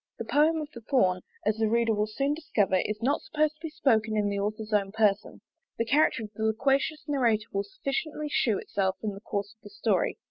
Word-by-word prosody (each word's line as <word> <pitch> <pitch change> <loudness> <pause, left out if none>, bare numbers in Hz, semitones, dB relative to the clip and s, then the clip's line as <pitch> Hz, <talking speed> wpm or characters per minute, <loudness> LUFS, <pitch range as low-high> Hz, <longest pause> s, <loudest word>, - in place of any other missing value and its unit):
The 230 - -5
poem 300 +7 +3
of 300 - -5
the 235 - -9
Thorn, 190 -8 +2 0.2
as 215 +1 +1
the 220 -1 +1
reader 230 0 +2
will 210 0 0
soon 275 +7 0
discover, 210 - +1
is 210 +4 -2
not 280 +4 +1
supposed 305 0 0
to - - -36
be 325 - -4
spoken 225 -10 +1
in 205 -1 +1
the 200 0 -2
author's 215 +2 -3
own 200 -2 +2
person: 210 -1 +1 0.4
the 230 - 0
character 260 -1 +3
of 210 - -8
the 220 - -8
loquacious 270 +7 +1
narrator 235 -7 +2
will 200 0 -1
sufficiently 305 -2 -3
shew 230 -7 +1
itself 190 -1 -1
in 210 -2 -2
the 195 - -10
course 205 -1 -4
of 220 - -46
the 205 - -12
story. 205 -2 0
220 Hz, 220 wpm, -28 LUFS, 205-275 Hz, 0.4 s, poem